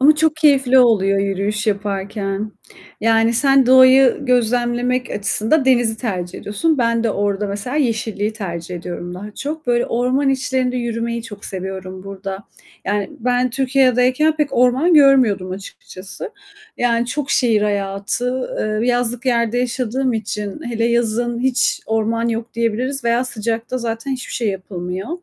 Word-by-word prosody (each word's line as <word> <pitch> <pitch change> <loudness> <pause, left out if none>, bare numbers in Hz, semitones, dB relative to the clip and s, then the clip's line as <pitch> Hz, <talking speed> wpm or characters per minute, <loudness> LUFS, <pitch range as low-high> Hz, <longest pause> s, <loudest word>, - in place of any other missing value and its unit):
Ama 295 +3 +6
çok 310 0 +1
keyifli 275 -4 +4
oluyor 200 -5 +4
yürüyüş 200 +2 -1
yaparken. 200 0 -2 0.5
Yani 225 +1 +3
sen 270 +1 +4
doğayı 260 0 +6
gözlemlemek 245 0 0
açısında 220 +7 +1
denizi 240 -4 +3
tercih 185 -7 -4
ediyorsun. 295 +9 -1
Ben 230 -1 +1
de 225 - +2
orada 205 0 -1
mesela 205 +7 -4
yeşilliği 220 -5 -1
tercih 180 -5 -6
ediyorum 175 0 -6
daha 200 +4 -8
çok. 310 +1 -5
Böyle 240 0 +1
orman 255 +4 +1
içlerinde 260 -2 0
yürümeyi 235 -1 -3
çok 205 -3 -10
seviyorum 190 0 -6
burada. 195 0 -7 0.4
Yani 205 -1 -1
ben 250 +1 +1
Türkiye'deyken 260 +3 +2
pek 300 -2 +1
orman 255 +8 +3
görmüyordum 260 -10 +4
açıkçası, 190 - -8 0.5
yani, 235 -1 +1
çok 280 +2 -3
şehir 225 -5 +2
hayatı, 205 +5 -2
eee, 215 +3 -1
yazlık 245 +1 0
yerde 235 -1 +1
yaşadığım 250 +1 -1
için, 210 +1 -4
hele 230 -2 -2
yazın 235 0 0
hiç 260 0 +1
orman 225 +1 0
yok 230 0 -4
diyebiliriz 235 +4 -1
veya 235 +2 +2
sıcakta 230 +1 -3
zaten 230 +2 -4
hiçbir 255 -1 -6
şey 230 -3 -1
yapılmıyor. 185 0 -5
235 Hz, 140 wpm, -19 LUFS, 205-255 Hz, 0.5 s, Ama